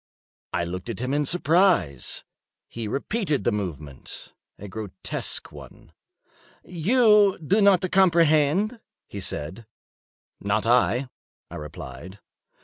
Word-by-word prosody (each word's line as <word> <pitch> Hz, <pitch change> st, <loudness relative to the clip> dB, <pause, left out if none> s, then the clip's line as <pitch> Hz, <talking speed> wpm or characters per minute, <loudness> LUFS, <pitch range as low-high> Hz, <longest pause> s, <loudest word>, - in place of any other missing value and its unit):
I 85 Hz, -, -1 dB
looked 90 Hz, +5 st, -6 dB
at 115 Hz, -, -4 dB
him 130 Hz, +2 st, -2 dB
in 145 Hz, -1 st, +1 dB
surprise. 170 Hz, -, +2 dB, 0.4 s
He 115 Hz, -2 st, -6 dB
repeated 150 Hz, -, -1 dB
the 120 Hz, -, +2 dB
movement—a 85 Hz, -, -8 dB
grotesque 100 Hz, -2 st, -5 dB
one. -, -, -14 dB, 0.7 s
"You 210 Hz, +2 st, +4 dB
do 190 Hz, +7 st, +1 dB
not 195 Hz, -2 st, +5 dB
comprehend?" 170 Hz, -, +3 dB, 0.3 s
he 100 Hz, -, -8 dB
said. 95 Hz, +4 st, -6 dB, 0.7 s
"Not 105 Hz, +2 st, -1 dB
I," 125 Hz, +2 st, +2 dB, 0.4 s
I -, -, -7 dB
replied. 75 Hz, +4 st, -9 dB
130 Hz, 105 wpm, -25 LUFS, -, 0.7 s, not